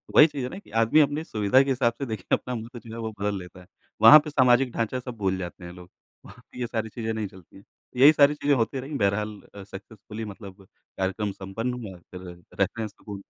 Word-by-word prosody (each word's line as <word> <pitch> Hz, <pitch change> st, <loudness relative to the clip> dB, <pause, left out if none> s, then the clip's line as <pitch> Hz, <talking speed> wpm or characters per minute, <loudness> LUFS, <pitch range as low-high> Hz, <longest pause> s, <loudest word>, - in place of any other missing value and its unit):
वही 155 Hz, -, +9 dB
चीज़ 140 Hz, -4 st, -6 dB
है -, -, -5 dB
ना 190 Hz, -, -8 dB
कि -, -, -21 dB
आदमी 115 Hz, +7 st, +4 dB
अपनी 150 Hz, +1 st, +2 dB
सुविधा 105 Hz, +1 st, +2 dB
के 135 Hz, -, -4 dB
हिसाब 120 Hz, -3 st, +1 dB
से, 140 Hz, -, -2 dB
देखिए, 110 Hz, -6 st, -6 dB
अपना 125 Hz, -1 st, -6 dB
महत्व 115 Hz, +2 st, -8 dB
जो 115 Hz, 0 st, -12 dB
है, -, -, -7 dB
वो 110 Hz, -1 st, -4 dB
बदल 100 Hz, -1 st, -1 dB
लेता 90 Hz, +1 st, -12 dB
है। -, -, -16 dB, 0.4 s
वहाँ 150 Hz, +8 st, +10 dB
पे 150 Hz, +1 st, -7 dB
सामाजिक 130 Hz, -2 st, +3 dB
ढाँचा 115 Hz, +3 st, -2 dB
सब 125 Hz, -1 st, -8 dB
भूल 95 Hz, -2 st, -1 dB
जाते 90 Hz, 0 st, -7 dB
हैं 85 Hz, -, -8 dB
लोग। 90 Hz, 0 st, -13 dB, 0.4 s
वहाँ -, -, -14 dB
पे 125 Hz, -, -11 dB
ये 120 Hz, -, -2 dB
सारी 110 Hz, -1 st, -3 dB
चीज़ें 110 Hz, +1 st, -4 dB
नहीं 110 Hz, -2 st, -3 dB
चलती 95 Hz, -3 st, -18 dB
हैं। 100 Hz, -, -16 dB, 0.3 s
यही 140 Hz, +4 st, +8 dB
सारी 145 Hz, 0 st, +5 dB
चीज़ें 145 Hz, -1 st, +1 dB
होती 130 Hz, +3 st, -1 dB
रही, 140 Hz, +4 st, -8 dB
बहरहाल 105 Hz, +1 st, -1 dB, 0.2 s
अ, 100 Hz, -, -9 dB
सक्सेसफुली 105 Hz, +2 st, -9 dB
मतलब 100 Hz, -2 st, -11 dB, 0.3 s
कार्यक्रम 95 Hz, +2 st, -2 dB
संपन्न 100 Hz, +6 st, -5 dB
हुआ, 110 Hz, -7 st, -8 dB
फिर 90 Hz, 0 st, -9 dB, 0.3 s
रेफ़रेंस 110 Hz, -3 st, -1 dB
तो। 100 Hz, -2 st, -10 dB
110 Hz, 235 wpm, -25 LUFS, 100-125 Hz, 0.4 s, वहाँ